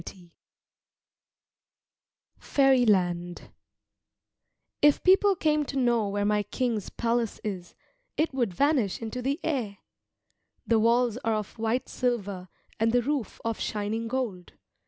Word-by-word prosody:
jpg] 175 0 -12 2.1
FAIRYLAND 195 -11 +2 1.3
If 295 -1 +4
people 385 +1 +5
came 305 -3 +1
to 275 - -5
know 240 -5 +2
where 205 0 -1
my 210 0 +2
king's 230 -1 -2
palace 235 -1 -1
is, 190 -5 -5 0.4
it 315 -2 +1
would 240 -6 0
vanish 260 - +1
into 230 +2 -5
the 275 +4 -1
air. 240 -10 -2 0.9
The 230 -1 +3
walls 235 +1 +2
are 225 -3 -1
of 215 +1 -5
white 225 +3 -1
silver 200 -7 -2 0.3
and 225 +1 +2
the 245 0 +2
roof 275 -5 -2
of 230 -1 -2
shining 215 +2 -2
gold. 225 -8 -4
230 Hz, 120 wpm, -27 LUFS, 205-260 Hz, 2.1 s, people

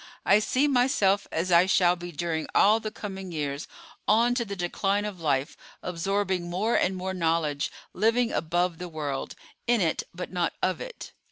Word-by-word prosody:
I 200 - +6
see 260 +6 +2
myself 245 -7 +2
as 175 +3 -1
I 175 +2 +6
shall 180 -2 +4
be 175 0 -8
during 160 0 -2
all 215 +2 +6
the 220 - -4
coming 195 -3 -7
years 145 -2 -3 0.4
on 230 +3 +4
to 245 -1 0
the 200 -3 -5
decline 195 +3 0
of 195 -5 -6
life, 140 -3 0 0.3
absorbing 180 0 -1
more 205 +7 0
and 190 - +2
more 185 +1 -3
knowledge, 160 -5 0 0.2
living 230 +2 +2
above 175 +1 0
the 180 0 -5
world; 145 -4 -4 0.3
in 240 -1 +4
it, 165 -4 +1
but 180 +1 -7
not 175 -2 0
of 185 - 0
it." - - -8
185 Hz, 175 wpm, -27 LUFS, 170-210 Hz, 0.4 s, I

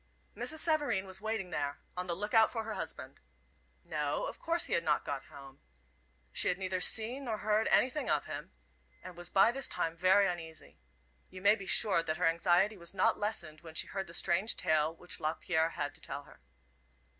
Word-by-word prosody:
Mrs. 315 - -1
Savareen 295 - +1
was 190 +1 -6
waiting 215 -4 -3
there, 145 -2 -2 0.2
on 180 0 -4
the 170 - -1
look 210 +4 -4
out 225 -1 +6
for 225 -2 -3
her 220 0 -5
husband. - - -5 0.6
No, - - -2
of - - -7
course 335 +1 +1
he - - -4
had 170 - +1
not 150 -2 +1
got 140 -1 -4
home. 135 -1 -13 0.7
She - - 0
had 180 - +1
neither 185 -1 -2
seen 240 +8 +2
nor 225 -3 -2
heard 215 +1 +1
anything 260 +4 +2
of - - +1
him, - - -7 0.5
and 180 -1 -9
was 175 0 -6
by 195 +4 +5
this 270 +2 0
time 165 0 -2
very 185 +3 +4
uneasy. 165 -3 -6 0.5
You 185 - -10
may 205 +1 +7
be 200 -3 -6
sure 195 -4 +4
that 155 -1 -3
her 180 - +1
anxiety 175 +5 +3
was 170 +2 -6
not 185 - +2
lessened 170 -7 -2
when 160 -2 -12
she - - +1
heard 195 -1 -5
the 170 - -5
strange 185 +7 +3
tale 155 0 +2
which 175 +2 -6
Lapierre 160 +1 0
had 145 -3 -4
to - - -11
tell 145 - -6
her. - - -18
185 Hz, 200 wpm, -32 LUFS, 165-215 Hz, 0.7 s, may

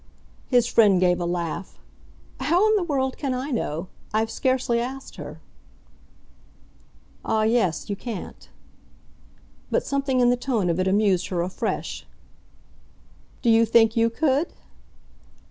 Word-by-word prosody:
His 245 -2 +4
friend 210 -6 +4
gave 180 -1 +3
a 170 - -1
laugh. 175 +1 -4 0.6
"How 340 +10 +3
in 435 - +3
the 410 - +2
world 270 -6 -1
can 270 -3 -1
I 265 +4 -4
know? 170 - -2 0.2
I've 220 +1 0
scarcely 255 -3 0
asked 265 +3 -6
her." - - -8 1.8
"Ah 220 -1 +1
yes. 220 -7 +1
You 205 - -2
can't." 220 -2 -8 1.2
But - - 0
something 275 -2 0
in 245 0 +4
the - - +3
tone 230 -8 0
of 170 - -2
it 185 - +1
amused 195 -2 +2
her 175 -2 -1
afresh. 180 +2 -4 1.4
"Do 235 - +4
you 225 0 +5
think 225 0 +4
you 230 0 +3
could?" 285 +5 0
230 Hz, 135 wpm, -24 LUFS, 195-265 Hz, 1.8 s, you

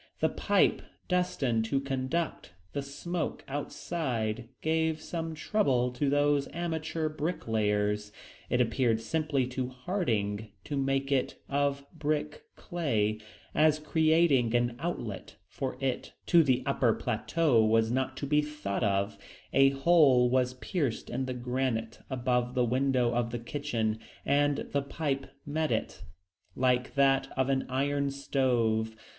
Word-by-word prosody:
The - - +3
pipe - - +2 0.3
destined 145 -11 +1
to 135 +5 +1
conduct 135 - -2 0.2
the 140 - -1
smoke 155 +4 -4
outside 125 -6 -3
gave 160 0 +1
some 165 0 -4
trouble 135 - +1
to 130 +3 0
these 145 0 +2
amateur 160 -1 -2
bricklayers. 105 -10 -1 0.4
It 125 - +1
appeared 120 -1 +2
simplest 135 +1 -1
to 125 0 -2
Harding 115 - -2
to 145 - -4
make 135 0 0
it 135 -2 +1
of 140 0 0
brick 150 -1 -2
clay; 110 -11 -1 0.3
as 155 0 +4
creating 155 -6 +3
an 120 0 +1
outlet 125 - -4
for 130 -1 -4
it 135 -1 -2
to 170 - +6
the 130 -4 +2
upper 130 -4 +2
plateau 125 +2 +2
was 110 +1 +3
not 130 +1 -1
to 140 - -3
be 150 +1 +3
thought 150 -9 -3
of, 100 0 0 0.3
a 135 0 +6
hole 135 -4 +5
was 125 0 +2
pierced 140 - -2
in 130 +2 -2
the 130 - -3
granite 125 -2 -2
above 125 -1 0
the 125 -1 +3
window 125 0 +2
of 120 -1 0
the 120 - -3
kitchen, 115 -3 -2 0.3
and 145 0 +3
the 140 - +1
pipe 140 -1 -2 0.2
met 155 +1 -1
it - - -2 0.5
like 125 0 +1
that 135 -1 +3
of 130 0 +2
an 135 -1 0
iron 140 +2 0
stove. 120 -5 0
135 Hz, 135 wpm, -30 LUFS, 120-150 Hz, 0.5 s, to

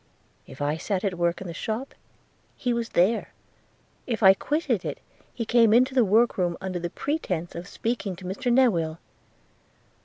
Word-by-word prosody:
If 135 +2 -7
I 150 +2 0
sat 190 +2 -2
at 195 -3 0
work 170 +1 0
in - - -6
the 170 - -5
shop, 225 - -4 0.6
he 245 -1 0
was 235 -1 -2
there: 195 +7 +2 0.4
– - - -37 0.3
if 230 -3 -2
I 190 0 +9
quitted 300 - -1
it, - - -4 0.3
he 230 - -4
came 230 -1 +5
into 255 +2 +4
the 255 -2 +4
work 220 +2 +3
room 175 -2 0
under 180 -2 -4
pretence 180 - -3
of 170 +2 -7
speaking 225 -3 -3
to 185 +1 -12
Mr 200 +7 -2
Newill. 175 -11 +3
200 Hz, 175 wpm, -26 LUFS, 175-240 Hz, 0.6 s, I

